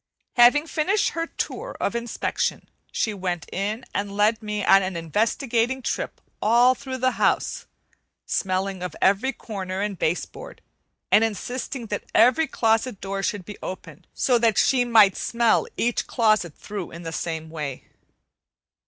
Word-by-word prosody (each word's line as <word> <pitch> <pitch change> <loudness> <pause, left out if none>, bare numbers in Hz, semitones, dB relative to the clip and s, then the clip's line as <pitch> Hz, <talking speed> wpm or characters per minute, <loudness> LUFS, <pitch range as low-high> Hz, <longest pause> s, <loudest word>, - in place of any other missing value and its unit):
Having 250 +5 +6
finished 365 +6 +1
her 330 0 -3
tour - - -5
of - - -1
inspection, 235 0 -2 0.2
she 215 - -1
went 180 -4 -3
in 210 +5 -2
and 200 0 -3
led 215 +2 +3
me 210 -1 -3
on 195 - +7
an 185 -1 -3
investigating 230 - 0
trip - - -3 0.2
all 240 +4 +5
through 260 0 -6
the 255 0 +2
house, - - +1 0.6
smelling 190 0 -1
of 180 -3 -5
every 200 +8 +3
corner 195 -6 -5
and 205 -3 -3
base 165 +3 0
board, - - -12 0.5
and 220 - +6
insisting 240 +3 -3
that 205 -2 -4
every 255 +7 +5
closet 225 -3 +1
door 195 0 -3
should 195 -2 -2
be 210 - -9
opened, 185 - -8
so 245 -3 +2
that 230 -3 +2
she 255 -2 +4
might 220 -5 +6
smell 235 -1 +1
each 240 0 0
closet 215 - +2
through 200 -4 -6
in 170 +1 -10
the 165 0 -5
same 160 -1 -4
way. 150 -5 -5
215 Hz, 155 wpm, -24 LUFS, 190-245 Hz, 0.6 s, on